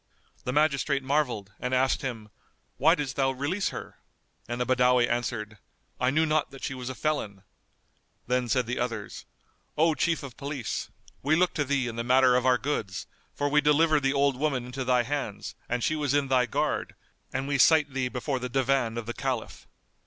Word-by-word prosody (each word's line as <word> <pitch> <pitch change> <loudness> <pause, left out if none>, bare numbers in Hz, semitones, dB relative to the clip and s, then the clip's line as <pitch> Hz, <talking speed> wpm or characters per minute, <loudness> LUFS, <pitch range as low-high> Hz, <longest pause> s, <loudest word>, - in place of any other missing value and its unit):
The 125 - -1
magistrate 140 -1 +1
marvelled 130 -8 0
and 125 +1 -1
asked 130 +1 +2
him, 115 -5 -5 0.5
"Why 160 +5 +5
didst 140 -6 -4
thou 135 -1 +3
release 145 +10 -1
her?"; - - -8 0.5
and 120 +1 -4
the 125 - +1
Badawi 125 -1 +4
answered, 115 -3 -3 0.4
"I 125 - +2
knew 155 +4 +2
not 155 -1 +1
that 135 -1 -12
she - - -2
was 125 -1 -6
a 130 - -5
felon." 105 -12 -2 0.8
Then 125 -1 0
said 125 -1 +2
the 125 +2 -3
others, 115 -4 -4 0.5
"O 160 +1 +4
Chief 160 +2 0
of 135 -4 -9
Police, 140 -4 -4 0.3
we 150 +4 +2
look 180 +2 +2
to 150 - 0
thee 140 -2 0
in 115 -1 -5
the 115 - -1
matter 130 +1 +5
of 125 +1 +2
our 125 -1 +5
goods; 110 -8 -3 0.3
for 145 - 0
we 150 +1 +3
delivered 150 +1 +4
the 135 0 +2
old 140 -1 +2
woman 135 -4 -1
into 125 +2 -4
thy 125 -1 +3
hands 135 -5 -4 0.2
and 125 -1 -1
she 155 - +1
was 145 -2 0
in 140 -2 +1
thy 125 -2 +3
guard; - - -1 0.4
and 135 +1 -2
we 140 -1 0
cite 150 -1 +5
thee 130 -1 0
before 130 +2 -2
the 125 0 -4
Divan 130 -3 +1
of 120 - -4
the 120 - -4
Caliph." 130 -3 -4
130 Hz, 195 wpm, -27 LUFS, 125-145 Hz, 0.8 s, Why